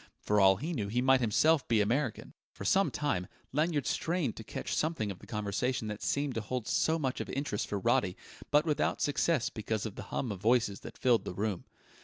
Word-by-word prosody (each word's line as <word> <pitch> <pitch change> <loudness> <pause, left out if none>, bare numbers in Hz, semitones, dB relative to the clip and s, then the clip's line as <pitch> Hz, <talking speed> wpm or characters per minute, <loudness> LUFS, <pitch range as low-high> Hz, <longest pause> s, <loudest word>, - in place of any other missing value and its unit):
For 105 0 +2
all 95 0 +7
he 155 - -4
knew 105 -9 -2
he 115 +5 0
might 130 +1 +4
himself 145 +7 +3
be 115 -2 +3
American... 120 +4 0 0.2
For 100 - -8
some 195 - +4
time 95 -12 -1 0.3
Lanyard 150 -1 +1
strained 165 -8 -1
to 110 - -7
catch - - -5
something 155 -10 0
of 95 - -9
the - - -14
conversation 105 +2 -2
that 105 0 -5
seemed 140 -1 0
to 115 - -2
hold 120 +1 -4
so 160 +1 +2
much 135 -5 -2
of - - -6
interest 135 -6 -2
for 100 - -2
Roddy, 95 -1 +1 0.3
but 150 +2 +4
without 150 -3 0
success 145 -2 +1
because 110 -1 -3
of 110 - -4
the - - -7
hum 125 - -2
of 95 -3 -6
voices 115 -3 +2
that - - -10
filled 120 -3 +3
the - - -6
room. 100 -2 -2
120 Hz, 215 wpm, -31 LUFS, 105-145 Hz, 0.3 s, all